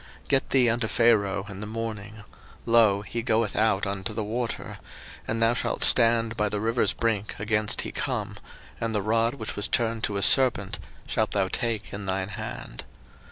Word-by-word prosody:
02:007:015 - - -25
Get 135 -1 +2
thee 130 -3 +4
unto 115 0 -1
Pharaoh 105 -4 +2
in 100 -2 -8
the 105 - -5
morning; 110 -1 -6 0.4
lo, 110 -4 +4
he 115 +4 -4
goeth 115 -2 0
out 105 -2 +2
unto 100 +1 -4
the 110 - -2
water; 115 +3 -4 0.5
and 115 - -1
thou 115 +1 +3
shalt 120 - -2
stand 115 -1 +4
by 105 -1 0
the 105 - -2
river's 115 +3 +1
brink 110 -3 -2
against 105 0 0
he - - -5
come; - - -3 0.4
and 115 -1 -2
the 105 - +1
rod 115 +4 +1
which 110 -6 -5
was 105 - -2
turned 115 -2 0
to 100 - -3
a 100 - -1
serpent 120 -8 +4 0.3
shalt 110 -1 0
thou 95 -2 +1
take 110 -4 -2
in 100 0 -6
thine 95 0 -2
hand. 105 - -7
110 Hz, 185 wpm, -26 LUFS, 100-115 Hz, 0.5 s, thee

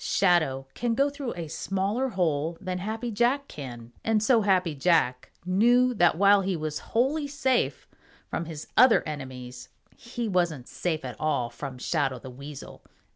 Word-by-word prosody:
Shadow 160 -8 +2
can 235 -1 -1
go 280 +3 +2
through 280 -4 -5
a 170 -2 -5
smaller 195 - -1
hole 165 - -1
than 185 -1 -4
Happy 220 +5 -4
Jack 245 +6 +1
can, 120 -4 -9
and 220 -1 +2
so 230 0 +4
Happy 185 -5 +2
Jack 140 -4 +1
knew 240 +7 +4
that 175 -6 +3
while 200 +1 +6
he 190 -1 -1
was 155 -2 -3 0.2
wholly 285 +5 +2
safe 265 -3 0 0.4
from 170 - -3
his 155 -2 -7
other 250 -1 +6
enemies, 130 -4 -7 0.3
he 235 -1 -5
wasn't 175 - 0
safe 160 -6 -3
at 125 -4 -7
all 140 -6 0
from 130 +1 -7
Shadow 135 -1 -1
the 130 - -10
Weasel. 140 +2 -10
180 Hz, 160 wpm, -27 LUFS, 145-230 Hz, 0.4 s, while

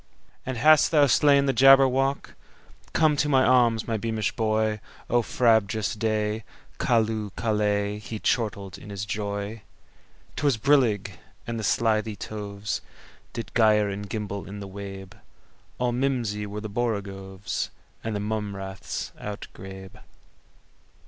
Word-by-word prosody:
"And 130 -2 -2
hast 155 +4 +6
thou 150 -3 +5
slain 140 +1 +4
the 135 - +2
Jabberwock? 135 +1 +5 0.6
Come 155 -2 +3
to 150 - +1
my 130 -2 +4
arms, 120 -4 +3
my 115 -1 0
beamish 110 0 -1
boy!O 110 +2 -1
frabjous 110 -3 +2
day! 110 0 -1 0.4
Callooh! 110 -2 +1
Callay!"He 105 0 -1
chortled 105 -4 -1
in - - -11
his 100 0 -4
joy.'T 100 +1 -7
was 140 -5 +3
brillig, 110 -7 +2 0.3
and 115 -1 -3
the - - -4
slithy 110 0 +1
tovesDid 105 +1 -7
gyre 105 -3 +4
and 100 +1 -5
gimble 100 -2 -4
in 100 +1 -7
the 100 - -7
wabe; 95 -1 -8 0.6
All 125 0 0
mimsy 120 -5 -1
were 105 +1 -6
the 110 - -4
borogoves, 100 -3 -3 0.3
And 110 -1 -3
the - - -1
mome 105 -1 -3
raths 95 0 -5
outgrabe. 95 -2 -8
110 Hz, 120 wpm, -26 LUFS, 100-120 Hz, 0.6 s, hast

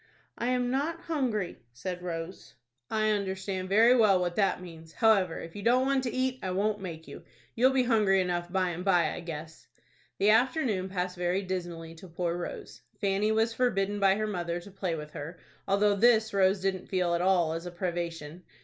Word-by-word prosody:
"I 235 - -3
am 250 -1 +1
not 310 +5 -1
hungry," 250 - -2
said 180 +8 -5
Rose. 170 0 -6 0.3
"I 215 -1 +1
understand 190 -2 -2
very 225 +5 +6
well 210 -6 +5
what 175 -1 -1
that 195 -3 +2
means. 165 -3 -12
However, 195 -6 +3
if 165 - -9
you 205 - -6
don't 250 +4 +3
want 270 0 +2
to 245 - -1
eat, 255 0 -1
I 190 - -3
won't 205 +3 0
make 165 -4 -7
you. 140 - -10 0.3
You'll 250 +3 +4
be 265 -1 +2
hungry 215 -5 +3
enough 175 -1 -1
by 185 -1 +1
and 175 +1 -5
by, 180 -3 +3
I - - -6
guess." 160 -1 -8 0.5
The 205 +2 +4
afternoon 225 - +1
passed 180 -1 -3
very 180 +2 0
dismally 175 -3 -5
to 165 +3 -12
poor 170 0 -2
Rose. 175 0 -7 0.2
Fanny 200 +1 +1
was 225 +1 +1
forbidden 205 -4 0
by 195 -1 +4
her 215 +1 -1
mother 175 -4 -3
to 200 - -13
play 185 -3 -2
with 150 -1 -7
her, 160 +4 -7 0.3
though 200 +1 +3
this 220 0 +4
Rose 190 0 +3
didn't 190 -1 -2
feel 180 -2 +1
at 170 - +1
all 180 -3 +2
as 165 +2 -5
a - - -6
privation. 170 -2 -4
190 Hz, 195 wpm, -29 LUFS, 175-215 Hz, 0.5 s, very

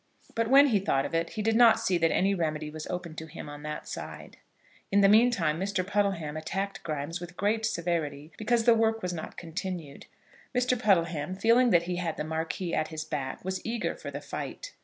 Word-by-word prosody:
But 230 0 0
when 275 +3 +7
he 210 -5 +3
thought 140 -8 +1
of - - -6
it, 165 0 -1
he 215 - -3
did 225 +1 +2
not 230 -1 +7
see 210 -5 +1
that 165 0 +3
any 195 +4 +2
remedy 155 -4 -2
was 155 0 -7
open 175 -2 -5
to 160 - -6
him 160 0 -9
on 145 0 -8
that 150 0 -6
side. - - -8 0.5
In 200 +1 +5
the 200 - +7
meantime 205 -8 +4
Mr. 190 -1 -1
Puddleham 195 -6 0
attacked 195 +5 -3
Grimes 155 +2 -4
with 175 0 -9
great 220 +2 +1
severity 165 -6 -2
because 230 +1 +1
the 235 - +6
work 225 0 +1
was 180 -1 -1
not 160 - -7
continued. 170 -3 -6 0.5
Mr. 250 0 +2
Puddleham, 175 -7 +1
feeling 230 +5 +4
that 170 -5 +4
he 175 0 -3
had 170 -3 -2
the - - -2
Marquis 160 +3 -3
at 155 0 +1
his 155 -1 -5
back, 150 -1 -4
was 190 0 -3
eager 230 +1 -2
for - - -8
the - - -6
fight. - - -6
180 Hz, 210 wpm, -28 LUFS, 160-220 Hz, 0.5 s, when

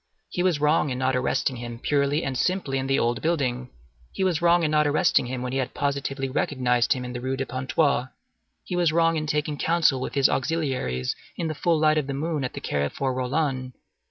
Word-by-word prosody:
He 175 - -1
was 180 -5 +2
wrong 150 0 +2
in 125 - -3
not 130 0 +1
arresting 125 0 0
him 120 0 -6
purely 145 +4 +1
and 135 - -2
simply 145 -3 0
in 130 - -3
the 135 - +2
old 120 +1 0
building; 130 -6 -1 0.4
he - - -2
was 180 -4 +1
wrong 170 0 +4
in 155 - +1
not 150 -1 +3
arresting 145 -3 +3
him 125 0 -4
when 125 0 -4
he 135 0 +1
positively 135 0 -2
recognized 125 -2 +1
him 125 -2 -5
in 125 - -6
the 125 - -5
Rue 130 +1 -2
de 135 - -2
Pontoise. 130 +1 0 0.6
He 180 - -4
was 175 -3 +3
wrong 165 0 +3
in 155 -1 -2
taking 150 0 -1
counsel 160 -6 +2
with - - -4
his 140 -1 +5
auxiliaries 130 - -1 0.2
in 165 -2 -2
the - - -2
full 165 +2 +1
light 155 0 +3
of 140 - -4
the 140 - -3
moon 155 0 -2
in 125 - -1
the - - -7
Carrefour 75 - -1
Rollin. 130 0 -1
140 Hz, 215 wpm, -25 LUFS, 130-155 Hz, 0.6 s, his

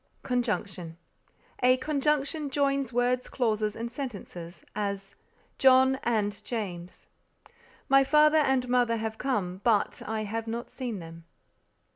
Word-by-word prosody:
CONJUNCTION 205 -9 -2 0.6
A 255 +1 +5
conjunction 300 +1 0
joins 275 -2 0
words, 245 +1 +1
clauses 215 -4 0
and 235 +1 -5
sentences; 200 - -7
as 200 -2 -3 0.5
"John 265 0 +5
and 210 -3 -1
James." 185 -7 -6 0.8
"My 275 0 +6
father 300 +2 +5
and 265 -4 +2
mother 245 -2 +2
have 220 0 -4
come, 195 -9 -2
but 220 -4 +2
I 220 0 -2
have 225 +2 -4
not 235 +2 -4
seen 245 -5 -4
them." 165 -1 -10
235 Hz, 120 wpm, -28 LUFS, 205-265 Hz, 0.8 s, My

